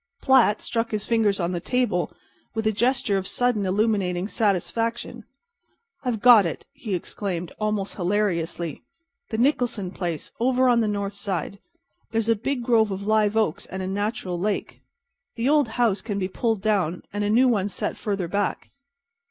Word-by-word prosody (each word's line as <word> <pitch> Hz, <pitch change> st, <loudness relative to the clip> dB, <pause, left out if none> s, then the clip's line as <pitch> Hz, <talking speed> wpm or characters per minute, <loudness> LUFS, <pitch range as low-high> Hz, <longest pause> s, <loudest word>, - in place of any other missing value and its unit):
Platt 260 Hz, -6 st, +4 dB
struck 230 Hz, 0 st, -1 dB
his 215 Hz, -2 st, -1 dB
fingers 220 Hz, -4 st, +2 dB
on 175 Hz, 0 st, 0 dB
the 175 Hz, -, -2 dB
table 240 Hz, -4 st, 0 dB, 0.4 s
with 220 Hz, 0 st, -2 dB
a 220 Hz, -, +3 dB
gesture 240 Hz, -2 st, +1 dB
of 190 Hz, -, -6 dB
sudden, 245 Hz, -5 st, +1 dB
illuminating 195 Hz, -2 st, +1 dB
satisfaction. 225 Hz, +3 st, -1 dB, 0.8 s
"I've 240 Hz, -5 st, -1 dB
got 240 Hz, -4 st, +8 dB
it!" 170 Hz, -, -4 dB
he 210 Hz, -6 st, -3 dB
exclaimed, 180 Hz, -1 st, -4 dB
almost 210 Hz, -2 st, -2 dB
hilariously—"the 210 Hz, -, -3 dB
Nicholson 240 Hz, -7 st, +1 dB
place, 170 Hz, -5 st, -4 dB
over 255 Hz, +2 st, +3 dB
on 240 Hz, -1 st, +4 dB
the 225 Hz, -, +2 dB
north 200 Hz, -1 st, -2 dB
side. 200 Hz, -1 st, -3 dB, 0.5 s
There's 225 Hz, 0 st, 0 dB
a 230 Hz, -, +5 dB
big 245 Hz, +4 st, -2 dB
grove 230 Hz, -3 st, +3 dB
of 195 Hz, 0 st, -4 dB
live 215 Hz, 0 st, +2 dB
oaks 215 Hz, -8 st, 0 dB
and 190 Hz, 0 st, -5 dB
a -, -, -3 dB
natural 200 Hz, -2 st, -2 dB
lake. 205 Hz, +2 st, -2 dB, 0.5 s
The 230 Hz, +2 st, -1 dB
old 295 Hz, -2 st, +4 dB
house 220 Hz, -5 st, +2 dB
can 210 Hz, -3 st, -4 dB
be 185 Hz, -2 st, -1 dB
pulled 220 Hz, +1 st, -1 dB
down 190 Hz, -6 st, 0 dB
and 205 Hz, 0 st, -1 dB
the 205 Hz, -, 0 dB
new 245 Hz, +5 st, +5 dB
one 205 Hz, -5 st, +1 dB
set -, -, -3 dB
further 200 Hz, -4 st, -2 dB
back." 200 Hz, +4 st, -2 dB
210 Hz, 165 wpm, -24 LUFS, 195-235 Hz, 0.8 s, got